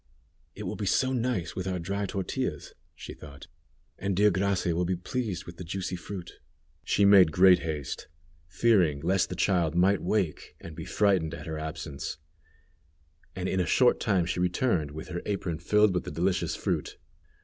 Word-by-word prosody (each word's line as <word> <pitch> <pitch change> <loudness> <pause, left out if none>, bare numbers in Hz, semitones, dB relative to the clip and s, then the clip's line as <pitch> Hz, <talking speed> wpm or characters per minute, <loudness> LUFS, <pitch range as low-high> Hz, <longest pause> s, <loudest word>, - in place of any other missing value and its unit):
"It - - -7
will - - -4
be - - -3
so 130 0 +2
nice 120 -8 -1
with 95 0 -4
our 95 -1 -1
dry 100 +4 -3
tortillas," 95 -1 -3 0.2
she - - -9
thought; 70 -3 -12 0.5
"and 100 0 -1
dear 105 +2 +4
Gracia 95 -2 0
will 90 - +1
be 90 +1 0
pleased 95 0 -4
with 85 0 -10
the 90 - -7
juicy 90 +1 -4
fruit." 90 0 -8 0.4
She 100 - +2
made 95 -5 +7
great 90 +2 +6
haste, 75 -5 -5 0.4
fearing 85 -6 +2
lest 90 +3 +1
the 90 - -4
child 85 -3 +1
might 95 +3 +3
wake, 90 -3 -1
and 80 - -10
be 80 0 -7
frightened 95 -6 +1
at - - -9
her 80 -2 -4
absence, 75 -2 -5 1.2
and 90 0 -3
in 95 - 0
a 90 - 0
short 125 +7 +4
time 95 -5 +1
she 90 +1 -2
returned 90 - +1
with 80 +4 -8
her 85 -1 -4
apron 95 -6 -2
filled 105 +3 +3
with 90 - -1
the - - -6
delicious 90 +5 0
fruit. - - -3
90 Hz, 180 wpm, -28 LUFS, 85-100 Hz, 1.2 s, made